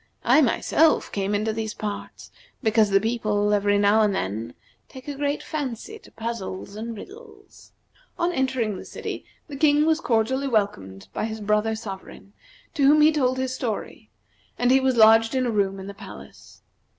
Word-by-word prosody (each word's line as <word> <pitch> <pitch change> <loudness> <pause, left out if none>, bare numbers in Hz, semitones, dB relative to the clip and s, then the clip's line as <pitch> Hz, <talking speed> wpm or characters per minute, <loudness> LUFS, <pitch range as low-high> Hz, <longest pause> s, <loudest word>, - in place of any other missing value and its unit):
I, 310 - +5
myself, 310 +4 +2
came 200 +1 -1
into 215 +2 -1
these 220 0 -4
parts 210 -2 -7 0.3
because 220 -1 +3
the 195 0 +4
people 210 -2 0
every 205 0 +2
now 205 +2 +4
and 205 -2 +2
then 110 - -4 0.3
take 260 +2 -12
a 290 - -3
great 285 +1 -2
fancy 300 - -5
to - - -18
puzzles 225 -4 -6
and 225 +1 -6
riddles." 420 - -14 0.5
On 345 +1 +1
entering 260 - -1
the - - -8
city, - - -6 0.2
the 290 - -8
King 295 +1 +3
was 320 0 +2
cordially 260 +2 0
welcomed 95 - -2
by - - -2
his 220 0 -5
brother 210 +1 +1
sovereign, 200 -1 -9 0.4
to 275 -3 +3
whom 300 +2 +6
he 305 +1 +6
told 260 -4 +1
his 260 0 -2
story; 235 -5 -5 0.5
and 245 0 +2
he 265 - +6
was 260 -1 +1
lodged 225 +2 +6
in 255 -1 +1
a 240 - 0
room 195 -2 0
in 190 - -8
the 200 - -7
palace. - - -13
225 Hz, 175 wpm, -24 LUFS, 205-270 Hz, 0.5 s, whom